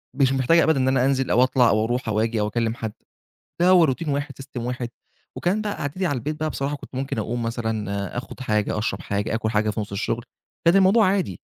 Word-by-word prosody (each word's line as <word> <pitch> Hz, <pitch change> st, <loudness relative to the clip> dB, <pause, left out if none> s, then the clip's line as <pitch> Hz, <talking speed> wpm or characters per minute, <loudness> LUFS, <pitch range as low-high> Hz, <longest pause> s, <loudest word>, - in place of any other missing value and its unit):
مش 135 Hz, -2 st, +3 dB
محتاجة 135 Hz, +6 st, +4 dB
أبدًا 160 Hz, -4 st, +3 dB
إن 130 Hz, -, +1 dB
أنا 130 Hz, -1 st, +3 dB
أنزل 135 Hz, -1 st, +1 dB
أو 125 Hz, -, +5 dB
أطلع 130 Hz, -2 st, +4 dB
أو 110 Hz, +2 st, +2 dB
أروح 120 Hz, 0 st, -2 dB
أو 105 Hz, -, +1 dB
آجي 115 Hz, 0 st, 0 dB
أو 105 Hz, -, +1 dB
أكلم 115 Hz, +1 st, -1 dB
حد، 110 Hz, -3 st, -5 dB, 0.7 s
ده 180 Hz, -, +5 dB
هو 180 Hz, -3 st, +7 dB
روتين 155 Hz, +3 st, -1 dB
واحد، 140 Hz, 0 st, -1 dB
system 130 Hz, -3 st, -7 dB
واحد، 125 Hz, 0 st, -3 dB, 0.5 s
وكان 200 Hz, +5 st, 0 dB
بقى 205 Hz, -1 st, -2 dB
قعدتي 165 Hz, +7 st, -2 dB
على 145 Hz, -, 0 dB
البيت 150 Hz, +5 st, -4 dB
بقى، 155 Hz, -, 0 dB
بصراحة 140 Hz, +1 st, -2 dB
كنت -, -, -13 dB
ممكن 135 Hz, -2 st, -3 dB
أقوم 115 Hz, +2 st, -2 dB
مثلًا، 110 Hz, -3 st, -3 dB
آخد 130 Hz, -, -7 dB
حاجة، 105 Hz, -3 st, 0 dB
أشرب 100 Hz, -3 st, -2 dB
حاجة، 100 Hz, +2 st, -2 dB
آكل 110 Hz, -1 st, -1 dB
حاجة 110 Hz, -1 st, +1 dB
في 110 Hz, -, -3 dB
نص 100 Hz, -1 st, -6 dB
الشغل، 115 Hz, +4 st, -2 dB, 0.4 s
كان 170 Hz, +3 st, +6 dB
الموضوع 195 Hz, +2 st, +5 dB
عادي، 185 Hz, -, 0 dB
125 Hz, 230 wpm, -23 LUFS, 110-145 Hz, 0.7 s, هو